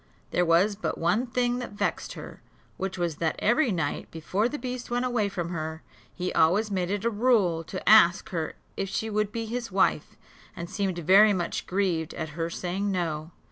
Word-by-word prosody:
There 175 Hz, -1 st, +2 dB
was 180 Hz, +5 st, +4 dB
but 215 Hz, -, -3 dB
one 215 Hz, +10 st, +1 dB
thing 245 Hz, 0 st, 0 dB
that 245 Hz, -, -6 dB
vexed 205 Hz, -, -2 dB
her; -, -, -10 dB, 0.4 s
which 190 Hz, 0 st, -3 dB
was 170 Hz, -4 st, -2 dB
that 165 Hz, -1 st, 0 dB
every 240 Hz, +3 st, +2 dB
night, 165 Hz, -6 st, -2 dB
before 185 Hz, +8 st, -1 dB
the 295 Hz, -, -4 dB
beast 250 Hz, -2 st, -5 dB
went 245 Hz, +1 st, 0 dB
away 235 Hz, -5 st, 0 dB
from 175 Hz, -3 st, -4 dB
her, 160 Hz, -2 st, -5 dB, 0.3 s
he 180 Hz, 0 st, -4 dB
always 205 Hz, +7 st, +3 dB
made 180 Hz, -2 st, -1 dB
it 205 Hz, +2 st, -2 dB
a -, -, +4 dB
rule 205 Hz, -8 st, +2 dB
to 185 Hz, -, -7 dB
ask 210 Hz, -3 st, +6 dB
her 165 Hz, -3 st, -3 dB, 0.2 s
if 195 Hz, -, -3 dB
she 220 Hz, +2 st, -2 dB
would 210 Hz, 0 st, 0 dB
be 230 Hz, 0 st, -3 dB
his 235 Hz, 0 st, -4 dB
wife, 190 Hz, +1 st, +1 dB, 0.4 s
and 170 Hz, -, -6 dB
seemed 195 Hz, -4 st, -1 dB
very 195 Hz, +5 st, +6 dB
much 175 Hz, -3 st, -3 dB
grieved 180 Hz, -5 st, -1 dB
at 160 Hz, -2 st, -4 dB
her 165 Hz, +2 st, -3 dB
saying 185 Hz, +4 st, -2 dB
no. 165 Hz, -4 st, -2 dB
195 Hz, 195 wpm, -27 LUFS, 170-220 Hz, 0.4 s, ask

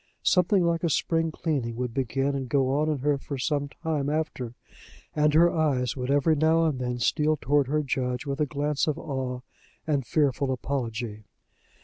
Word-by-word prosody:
Something 180 Hz, 0 st, +3 dB
like 170 Hz, 0 st, 0 dB
a 170 Hz, -, +2 dB
spring 165 Hz, +2 st, +1 dB
cleaning 140 Hz, -8 st, -2 dB
would 125 Hz, -1 st, -3 dB
begin 135 Hz, +2 st, 0 dB
and 135 Hz, -2 st, -3 dB
go 135 Hz, -1 st, +2 dB
on 150 Hz, +3 st, +1 dB
in 150 Hz, -, 0 dB
her 145 Hz, 0 st, +1 dB
for 140 Hz, 0 st, -6 dB
some 145 Hz, +2 st, -1 dB
time 150 Hz, -3 st, -2 dB
after, 150 Hz, -6 st, -3 dB, 0.6 s
and 150 Hz, 0 st, +3 dB
her 170 Hz, +2 st, +6 dB
eyes 135 Hz, -7 st, +1 dB
would 125 Hz, -1 st, -4 dB
every 145 Hz, +3 st, +3 dB
now 160 Hz, +2 st, +3 dB
and 150 Hz, -5 st, 0 dB
then 125 Hz, -1 st, -2 dB
steal 150 Hz, +5 st, +1 dB
toward 140 Hz, +2 st, +2 dB
her 150 Hz, +2 st, 0 dB
judge 125 Hz, 0 st, -2 dB
with 140 Hz, 0 st, -3 dB
a 150 Hz, -, +2 dB
glance 145 Hz, +1 st, -1 dB
of 155 Hz, 0 st, 0 dB
awe 130 Hz, -3 st, -4 dB, 0.4 s
and 145 Hz, -4 st, 0 dB
fearful 140 Hz, -3 st, +1 dB
apology. 115 Hz, -4 st, -3 dB
140 Hz, 185 wpm, -26 LUFS, 130-155 Hz, 0.6 s, her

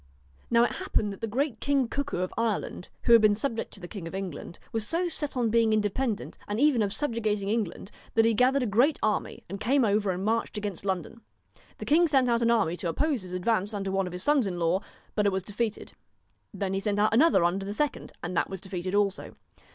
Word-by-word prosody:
Now 235 Hz, 0 st, +5 dB
it -, -, +1 dB
happened 205 Hz, -1 st, -1 dB
that 195 Hz, -, -12 dB
the 225 Hz, -, -1 dB
great 265 Hz, +4 st, -1 dB
King 275 Hz, -3 st, +1 dB
Cuckoo 280 Hz, +1 st, -3 dB
of 185 Hz, -, -3 dB
Ireland, 220 Hz, -5 st, -2 dB
who 235 Hz, -, +5 dB
had 230 Hz, -, +8 dB
been 210 Hz, -1 st, +5 dB
subject 225 Hz, +1 st, -3 dB
to -, -, -12 dB
the 175 Hz, -, -8 dB
King 185 Hz, -4 st, -7 dB
of 165 Hz, -, -7 dB
England, 185 Hz, -3 st, -6 dB
was 225 Hz, -1 st, -1 dB
so 345 Hz, +2 st, 0 dB
set 295 Hz, -5 st, -3 dB
on 235 Hz, -3 st, +1 dB
being 230 Hz, -1 st, +3 dB
independent, 215 Hz, +2 st, -1 dB
and 205 Hz, +2 st, -2 dB
even 285 Hz, -4 st, +4 dB
of 200 Hz, -2 st, 0 dB
subjugating 215 Hz, -6 st, -1 dB
England, 210 Hz, -3 st, -2 dB, 0.2 s
that 225 Hz, 0 st, +5 dB
he 230 Hz, -, +4 dB
gathered 255 Hz, +4 st, +3 dB
a -, -, 0 dB
great 245 Hz, +8 st, +3 dB
army, 215 Hz, -1 st, -1 dB
and 195 Hz, +3 st, -6 dB
came 255 Hz, +4 st, +3 dB
over 205 Hz, -1 st, +1 dB
and 185 Hz, +1 st, -2 dB
marched 225 Hz, 0 st, 0 dB
against 205 Hz, -3 st, -4 dB
London. 190 Hz, +4 st, -3 dB, 0.6 s
The -, -, -7 dB
king 335 Hz, +4 st, +4 dB
sent 265 Hz, -4 st, +3 dB
out 235 Hz, 0 st, +2 dB
an 235 Hz, -, +3 dB
army 205 Hz, -8 st, +2 dB
to 175 Hz, -, -3 dB
oppose 285 Hz, -, 0 dB
his 180 Hz, -1 st, -8 dB
advance 205 Hz, +2 st, 0 dB
under 195 Hz, -1 st, -2 dB
one 195 Hz, -1 st, 0 dB
of 180 Hz, -, -7 dB
his 180 Hz, -, -4 dB
sons 290 Hz, -7 st, +3 dB
in 180 Hz, -2 st, -3 dB
law, 170 Hz, +2 st, +1 dB, 0.3 s
but 210 Hz, -1 st, +2 dB
it -, -, +3 dB
was 190 Hz, -1 st, -2 dB
defeated; 210 Hz, +2 st, -3 dB, 0.6 s
then 195 Hz, -1 st, -3 dB
he 195 Hz, -, 0 dB
sent 205 Hz, 0 st, -1 dB
another 265 Hz, -, +5 dB
under 180 Hz, +3 st, +1 dB
the 200 Hz, -, -4 dB
second, 290 Hz, +7 st, -2 dB
and 180 Hz, +1 st, -4 dB
that -, -, +1 dB
was 190 Hz, -, -5 dB
defeated 185 Hz, 0 st, -4 dB
also. 200 Hz, -2 st, 0 dB
215 Hz, 230 wpm, -28 LUFS, 195-240 Hz, 0.6 s, had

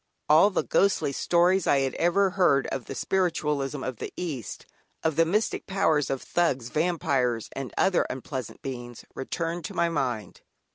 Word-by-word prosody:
All 160 Hz, +7 st, +6 dB
the 195 Hz, -, 0 dB
ghostly 195 Hz, -7 st, +2 dB
stories 175 Hz, +6 st, +2 dB
I 140 Hz, -, +4 dB
had 135 Hz, -1 st, -1 dB
ever 185 Hz, +2 st, +2 dB
read 155 Hz, -8 st, +3 dB
of 135 Hz, -4 st, -4 dB
the -, -, -7 dB
spiritualism 150 Hz, -7 st, -1 dB
of 130 Hz, -3 st, -4 dB
the -, -, -6 dB
East, 145 Hz, -, -5 dB, 0.4 s
of 160 Hz, -2 st, +1 dB
the 165 Hz, -, +4 dB
mystic 210 Hz, +6 st, 0 dB
powers 160 Hz, -7 st, +1 dB
of 135 Hz, -, -2 dB
"Thugs," 135 Hz, -9 st, 0 dB
"Vampires" 140 Hz, -8 st, 0 dB
and 135 Hz, -2 st, -6 dB
other 190 Hz, -2 st, +2 dB
unpleasant 130 Hz, -1 st, -6 dB
beings, 120 Hz, -3 st, -7 dB
returned 165 Hz, +5 st, -3 dB
to -, -, -6 dB
my 170 Hz, -, +2 dB
mind. 125 Hz, -, -3 dB
150 Hz, 160 wpm, -26 LUFS, 130-175 Hz, 0.4 s, All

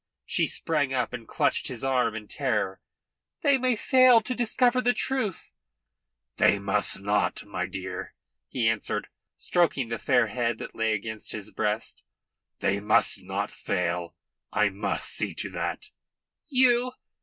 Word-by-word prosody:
She -, -, +1 dB
sprang 145 Hz, -5 st, 0 dB
up 125 Hz, -2 st, -1 dB
and 115 Hz, -2 st, -7 dB
clutched -, -, 0 dB
his 125 Hz, -1 st, -5 dB
arm 125 Hz, -4 st, +1 dB
in 105 Hz, -1 st, -7 dB
terror. 105 Hz, -9 st, -2 dB, 0.6 s
"They 280 Hz, -2 st, +4 dB
may 255 Hz, -1 st, +2 dB
fail 255 Hz, +1 st, +6 dB
to 240 Hz, +4 st, -2 dB
discover 245 Hz, +1 st, +2 dB
the 245 Hz, 0 st, +2 dB
truth." 255 Hz, -9 st, -1 dB, 0.9 s
"They -, -, +4 dB
must 100 Hz, 0 st, +1 dB
not, 100 Hz, +1 st, 0 dB
my -, -, -3 dB
dear," -, -, -6 dB, 0.3 s
he 120 Hz, -3 st, 0 dB
answered 115 Hz, -2 st, -1 dB
her; -, -, -28 dB, 0.3 s
stroking 155 Hz, -8 st, +1 dB
the 115 Hz, -, -3 dB
fair 125 Hz, -4 st, +3 dB
head 115 Hz, +1 st, -1 dB
that -, -, -8 dB
lay 110 Hz, -1 st, 0 dB
against 110 Hz, +1 st, -4 dB
his 110 Hz, -1 st, -6 dB
breast. 105 Hz, +2 st, -2 dB, 0.6 s
"They 100 Hz, +1 st, +1 dB
must 105 Hz, +1 st, +3 dB
not -, -, -3 dB
fail. 85 Hz, -1 st, -2 dB, 0.4 s
I 105 Hz, -, +2 dB
must 100 Hz, +2 st, -3 dB
see -, -, 0 dB
to -, -, -4 dB
that." -, -, -4 dB, 0.6 s
"You? 260 Hz, -3 st, +5 dB, 0.2 s
You?" 255 Hz, -, -5 dB
120 Hz, 155 wpm, -27 LUFS, -, 0.9 s, fail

